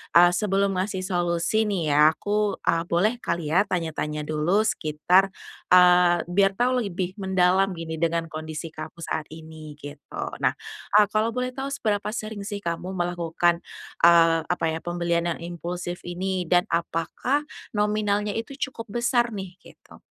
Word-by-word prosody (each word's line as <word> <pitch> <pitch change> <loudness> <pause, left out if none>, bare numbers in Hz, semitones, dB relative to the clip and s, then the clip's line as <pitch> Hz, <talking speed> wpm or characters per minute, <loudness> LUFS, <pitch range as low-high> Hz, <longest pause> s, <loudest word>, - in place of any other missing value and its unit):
eee, 175 +1 +8
sebelum 195 0 +1
ngasih 185 0 -2
solusi 175 +4 +1
nih 165 -7 0
ya, 150 +1 +7
aku, 205 +4 -1
eee, 165 0 +1
boleh 195 +7 +2
kali 170 -2 -2
ya 190 +3 +5
tanya-tanya 155 -5 -3
dulu? 155 +6 +1
Sekitar, 180 +2 +2 0.4
eee 180 -1 +6
biar 195 +2 +3
tahu 250 0 +2
lebih 185 -1 -4
mendalam 190 0 +2
gini, 165 -2 -5
dengan 165 0 0
kondisi 155 0 -6
kamu 170 - -8
saat 160 -1 -3
ini, 160 -1 -10
gitu. 145 0 -7 0.2
Nah, - - +4 0.5
ah, 210 - +6
kalau 215 +2 0
boleh 250 +1 -3
tahu 275 +1 -4
seberapa 210 -6 -1
sering 215 -3 -5
sih 205 0 -5
kamu 175 0 -4
melakukan, 175 -1 0 0.4
eee, 165 -1 +6
apa 180 0 -2
ya, 160 0 -2
pembelian 170 0 -1
yang - - -5
impulsif 175 +1 -5
ini? 185 +1 -2
Dan 175 +1 +2
apakah 170 - -1 0.2
nominalnya 210 -1 0
itu 230 +4 -4 0.2
cukup 230 -3 -9
besar 240 -1 +2
nih, 190 -3 -7
gitu? - - -17
180 Hz, 150 wpm, -25 LUFS, 170-205 Hz, 0.5 s, eee